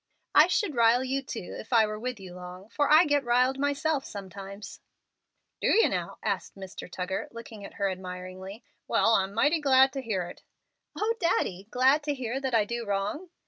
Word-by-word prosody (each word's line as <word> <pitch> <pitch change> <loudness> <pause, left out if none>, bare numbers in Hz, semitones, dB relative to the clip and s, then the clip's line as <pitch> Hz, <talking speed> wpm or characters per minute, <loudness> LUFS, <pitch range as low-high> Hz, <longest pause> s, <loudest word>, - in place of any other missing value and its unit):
"I - - +7
should 410 -8 0
'rile' 235 +1 +4
you, 270 +1 -1
too, 225 -8 -7
if 220 - -11
I 225 -3 +5
were 215 0 -5
with 250 0 -4
you 185 -2 -10
long, 180 +2 -10
for 290 +4 0
I 315 +3 +8
get 290 -2 +2
'riled' 250 +2 +2
myself 285 +1 0
sometimes." 200 0 -9 0.8
"Do - - +1
you, 455 - +5
now?" - - -3
asked - - -2
Mr. 190 -2 -9
Tuggar, 185 +1 -3
looking 230 -2 -10
at - - -10
her 200 - 0
admiringly. 185 +2 -7 0.2
"Well, 225 - +3
I'm 195 -2 +2
mighty 295 +10 +2
glad 265 -1 +5
to 270 - -3
hear 210 -7 -2
it." 175 - -10 0.6
"O 440 +2 +1
Daddy! 200 - 0
glad 265 +5 +4
to 290 -1 0
hear 255 0 -3
that 265 -3 -1
I 215 -2 +4
do 235 +2 -3
wrong?" 205 - -2
230 Hz, 190 wpm, -28 LUFS, 195-270 Hz, 0.8 s, I